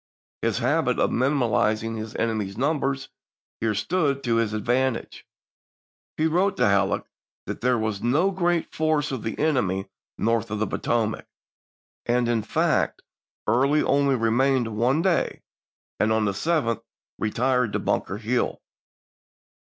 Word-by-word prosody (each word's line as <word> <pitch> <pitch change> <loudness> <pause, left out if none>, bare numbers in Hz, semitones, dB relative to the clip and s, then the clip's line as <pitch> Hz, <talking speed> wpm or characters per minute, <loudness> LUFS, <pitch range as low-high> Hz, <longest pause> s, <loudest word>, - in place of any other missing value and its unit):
His - - 0
habit - - +1
of - - +2
minimizing 115 -4 +1
his 110 0 -6
enemy's 105 -3 -2
numbers 135 0 -1 0.5
here 110 -2 0
stood 140 - 0
to 115 -2 +1
his 115 -2 +1
advantage. 120 +4 -1 0.9
He 155 - +1
wrote 185 +5 +2
to - - +3
Halleck 100 -1 +2 0.4
that - - -5
there 125 0 +2
was 110 -3 -2
"no 150 +11 +2
great 175 -2 0
force 155 -2 +1
of 130 -4 -3
the 110 - -4
enemy 115 - 0 0.3
north 115 0 0
of 105 - -2
the 110 - 0
Potomac 110 -1 -1 0.4
"; - - -84
and, 120 0 +2
in 120 -2 +1
fact, 105 - 0 0.4
Early 135 +7 +3
only 140 0 +3
remained 120 0 +1
one 130 +9 +2
day, 185 -3 0 0.6
and 110 - +2
on 110 -1 +2
the 100 - +1
7th 115 - 0 0.4
retired 125 +1 +1
to - - +1
Bunker 95 - -1
Hill. 115 +3 -1
120 Hz, 140 wpm, -25 LUFS, 110-140 Hz, 0.9 s, to